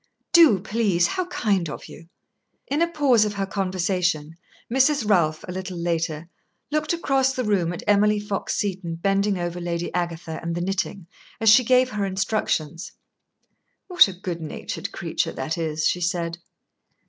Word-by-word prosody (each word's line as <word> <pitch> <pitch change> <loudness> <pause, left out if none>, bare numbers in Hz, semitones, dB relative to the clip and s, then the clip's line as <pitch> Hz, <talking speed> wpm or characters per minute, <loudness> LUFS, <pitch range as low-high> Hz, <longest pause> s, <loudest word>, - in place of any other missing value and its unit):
"Do, 330 - +7
please. 195 -3 +1
How 360 - -1
kind 205 - 0
of - - -7
you!" 165 - -13 0.6
In 290 +3 -1
a 340 - +4
pause 280 -9 +3
of 210 -1 -1
her 195 -1 -1
conversation, 185 -5 -1 0.3
Mrs. 265 -1 +2
Ralph, 160 -6 +2
a - - -5
little 185 0 -5
later, 165 -2 -2 0.4
looked 305 0 0
across 270 -6 +1
the 255 - -1
room 195 -6 +1
at 175 - -6
Emily 210 +1 +3
Fox 205 -1 -3
Seton 190 -4 -2
bending 195 +3 +1
over 175 0 -4
Lady 170 0 -3
Agatha 170 -2 -3
and 170 0 -3
the 175 - -2
knitting, 190 0 -2 0.3
as 225 -1 +4
she 250 +4 +7
gave 255 +1 +3
her 210 -1 -2
instructions. 185 -4 -2 1.0
"What 360 - +7
a 195 - -6
good 175 -3 -4
natured 155 - -5
creature - - -2
that 135 +5 -3
is!" 160 -2 -2
she 180 - +1
said. 170 -1 -2
190 Hz, 160 wpm, -24 LUFS, 170-215 Hz, 1.0 s, Do